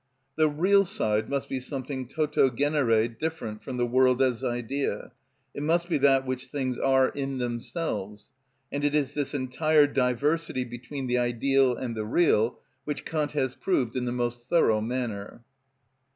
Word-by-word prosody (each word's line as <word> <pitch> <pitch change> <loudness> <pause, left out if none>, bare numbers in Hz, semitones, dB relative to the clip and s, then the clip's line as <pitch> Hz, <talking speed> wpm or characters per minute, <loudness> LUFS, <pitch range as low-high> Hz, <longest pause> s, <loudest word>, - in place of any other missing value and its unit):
The 155 -1 +3
real 190 +7 +4
side 110 - 0
must 140 -1 -2
be 135 - -3
something 130 0 -5
toto 150 -1 +2
genere 125 -4 +2
different 115 -3 -5
from 130 -2 -5
the 120 - +1
world 125 +1 +3
as 125 -3 +1
idea, 120 +4 -2 0.4
it - - -5
must 170 +3 +1
be 165 - +1
that 135 -1 +4
which 130 0 -4
things 130 -4 -3
are 135 -1 +3
in 135 -1 -4
themselves; 120 - -4 0.4
and 145 0 -3
it 145 0 +1
is 145 -2 +1
this 145 -1 -2
entire 145 +3 +3
diversity 140 +2 0
between 125 +3 -7
the 125 0 +1
ideal 125 +2 +2
and 120 -1 -4
the 110 -1 -3
real 120 -5 +2 0.3
which 150 -1 -4
Kant 150 -3 -2
has 130 -3 0
proved 130 -8 -1
in 125 -1 -1
the 120 - -1
most 120 0 -3
thorough 110 -11 +3
manner. 115 -2 -4
130 Hz, 165 wpm, -27 LUFS, 120-145 Hz, 0.4 s, real